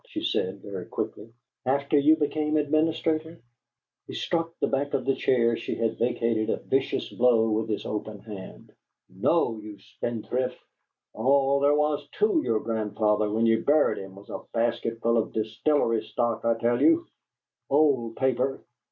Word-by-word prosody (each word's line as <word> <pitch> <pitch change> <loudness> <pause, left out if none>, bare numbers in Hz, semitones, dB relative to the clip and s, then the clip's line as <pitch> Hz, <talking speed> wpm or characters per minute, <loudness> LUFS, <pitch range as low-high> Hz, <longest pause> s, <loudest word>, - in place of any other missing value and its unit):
she 315 -9 -5
said, 100 - -1
very 95 -3 -6
quickly. 110 +2 -5 0.3
"After 140 +3 0
you 145 +2 +6
became 155 0 0
administrator?" 155 +2 0 0.7
He - - -7
struck 165 -1 -1
the - - +2
back 140 +1 -1
of 130 - -2
the 135 - +2
chair 115 -3 +2
she 115 - -4
had 115 -1 -1
vacated 115 -2 0
a - - +1
vicious 135 0 -1
blow 115 -2 +3
with 110 +1 -1
his 105 - -2
open 105 0 -4
hand. 100 -2 -11 0.4
"No, 115 - +1
you 105 -1 -9
spendthrift! 120 +5 -3 0.6
All 140 +1 +3
there 145 +1 +4
was 150 0 0
TO 420 -6 +2
your 110 - 0
grandfather 105 -1 0
when 110 +2 +1
you 115 0 +3
buried 150 +1 +3
him 95 0 -9
was 100 +1 -13
a - - -5
basket 115 0 -1
full 115 0 +3
of 110 - -3
distillery 115 +2 +1
stock, 120 -2 -2
I 115 0 +2
tell 120 +1 +1
you! 330 +1 +4 0.6
Old 135 -6 +2
paper! 130 0 0
120 Hz, 160 wpm, -26 LUFS, 110-145 Hz, 0.7 s, you